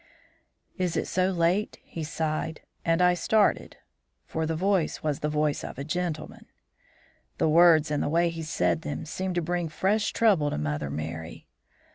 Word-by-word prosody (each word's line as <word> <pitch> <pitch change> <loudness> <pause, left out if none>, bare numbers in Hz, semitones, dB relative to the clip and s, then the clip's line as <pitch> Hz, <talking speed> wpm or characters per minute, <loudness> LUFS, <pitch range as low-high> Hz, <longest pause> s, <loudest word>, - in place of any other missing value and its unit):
"'Is 180 -2 0
it - - 0
so 185 0 +1
late?' 180 +3 +1
he 165 - -7
sighed; 160 0 -3 0.2
and 165 +2 +2
I 180 0 +5
started, 210 +4 +1 0.5
for 160 0 -2
the 160 - -1
voice 185 -1 0
was 150 -2 -1
the 150 - -1
voice 150 -1 0
of - - -7
a 140 - -4
gentleman. 155 0 -4 0.9
"The - - +2
words, 160 -1 +5
and 150 - 0
the - - 0
way 170 +2 +2
he 165 -1 -6
said 90 - 0
them, 75 -1 -5
seemed 185 +3 -3
to 175 - 0
bring 175 0 -1
fresh 205 +7 +1
trouble 195 -10 +3
to - - -3
Mother 75 -1 -2
Merry. 80 +3 -6
160 Hz, 170 wpm, -27 LUFS, 150-180 Hz, 0.9 s, I